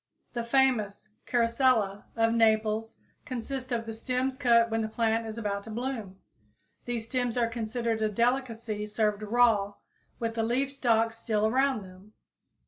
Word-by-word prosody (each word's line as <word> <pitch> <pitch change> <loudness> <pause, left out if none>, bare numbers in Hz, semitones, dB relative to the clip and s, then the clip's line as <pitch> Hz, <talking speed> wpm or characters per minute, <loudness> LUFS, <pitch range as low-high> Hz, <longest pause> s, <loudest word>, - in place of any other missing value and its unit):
The 235 - -2
famous 235 -5 +1 0.2
"Carosella" 230 -4 +2
of 225 0 +2
Naples 220 -1 +2 0.3
consists 255 +1 -5
of 230 -1 -1
the 225 - -5
stems 255 +3 -1
cut 235 -4 +4
when 225 0 +1
the 220 - -1
plant 225 0 0
is 220 +1 -6
about 200 -3 -2
to - - -9
bloom. 225 -4 -4 0.7
These 235 -2 -3
stems 245 -1 -1
are 240 - +3
considered 230 0 -2
a 215 - +3
great 210 - -7
delicacy 230 -3 0
served 210 -1 0
raw 215 -2 +3 0.4
with 230 -1 -2
the 225 - -1
leaf 255 +5 0
stalks 230 -4 +1
still 215 -2 0
around 260 0 +2
them. 190 +3 -15
230 Hz, 155 wpm, -28 LUFS, 215-245 Hz, 0.7 s, cut